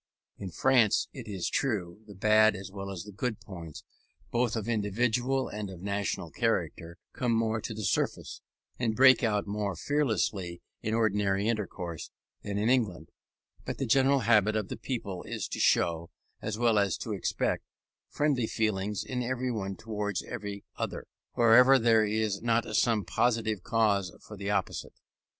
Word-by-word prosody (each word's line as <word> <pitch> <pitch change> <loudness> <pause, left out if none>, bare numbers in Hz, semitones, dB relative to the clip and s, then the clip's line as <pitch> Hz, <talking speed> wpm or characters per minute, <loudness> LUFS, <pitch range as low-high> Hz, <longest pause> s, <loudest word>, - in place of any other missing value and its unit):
In 95 - -5
France, 120 +4 +3
it 125 -5 -8
is 95 -4 -3
true, 105 -7 -1
the 105 - -11
bad 110 +2 +5
as 100 0 -8
well 100 0 -6
as 95 -3 -5
the 105 - -10
good 110 +2 -3
points, 85 -7 -9 0.5
both 120 -1 +1
of 110 -1 -3
individual 120 +4 0
and 105 -1 -5
of 90 -1 -10
national 100 0 -2
character, 85 +1 -1 0.2
come 125 -2 -1
more 110 -1 +1
to - - -5
the 110 - -5
surface, 90 - -1 0.4
and 115 -3 0
break 130 0 +6
out 105 -3 +1
more 100 -2 -2
fearlessly 105 - -1 0.2
in 110 +1 -1
ordinary 105 -2 +1
intercourse, 95 -7 -3 0.3
than 100 0 -4
in 105 +2 +1
England: 110 -11 +1 0.5
but - - -5
the - - -1
general 135 +3 +4
habit 105 -2 +4
of 105 -3 -1
the - - -4
people 100 -8 -4
is - - -3
to - - -4
show, 85 -1 +2 0.3
as 110 -1 -3
well 115 -3 +3
as 100 -3 +1
to - - -4
expect, - - -1 0.5
friendly 140 -6 +1
feeling 105 -2 -1
in 125 -1 -3
every 130 +1 -1
one 100 -4 -3
towards 105 -2 -3
every 100 -1 -6
other, - - -4 0.3
wherever 125 +3 +7
there 115 -2 +4
is 105 -2 -1
not 115 0 +2
some 110 -5 +2
positive 110 -3 0
cause 105 -4 +1
for 105 - -11
the 100 0 -4
opposite. 105 - -2
110 Hz, 165 wpm, -29 LUFS, 100-115 Hz, 0.5 s, wherever